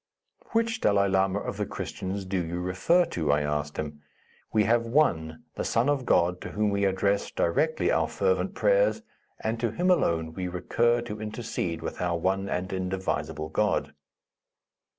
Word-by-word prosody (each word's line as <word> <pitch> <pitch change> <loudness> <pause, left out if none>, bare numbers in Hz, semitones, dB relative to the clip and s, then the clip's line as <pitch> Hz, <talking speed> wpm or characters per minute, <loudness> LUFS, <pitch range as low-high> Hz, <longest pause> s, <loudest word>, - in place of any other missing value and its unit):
"Which 230 0 +1
Dalai 100 -1 +3
Lama 95 0 +2
of - - -4
the - - -1
Christians 95 +1 -5
do 95 -1 -1
you 85 +2 -4
refer 95 - +2
to?" 80 -4 -1
I 75 +1 +3
asked 75 0 -2
him; 75 -1 -5 0.5
"we 110 - +3
have 115 +1 +2
one, 80 - +1
the - - -3
Son 120 +5 +1
of 140 -3 0
God, 90 +1 +3
to - - -6
whom 105 0 +1
we 100 0 +1
address 100 +1 +1
directly 155 - +1
our - - +2
fervent 475 - 0
prayers, - - +3 0.4
and 115 +1 -2
to 115 0 +1
him 180 - +1
alone 80 - +1
we 90 +2 -3
recur 120 +7 +1
to 110 -3 -6
intercede 110 -6 -3
with - - -5
our 90 -1 0
One 95 +3 0
and 95 +1 -2
Indivisible 90 -5 -2
God." 105 +6 0
95 Hz, 170 wpm, -27 LUFS, 85-115 Hz, 0.5 s, Dalai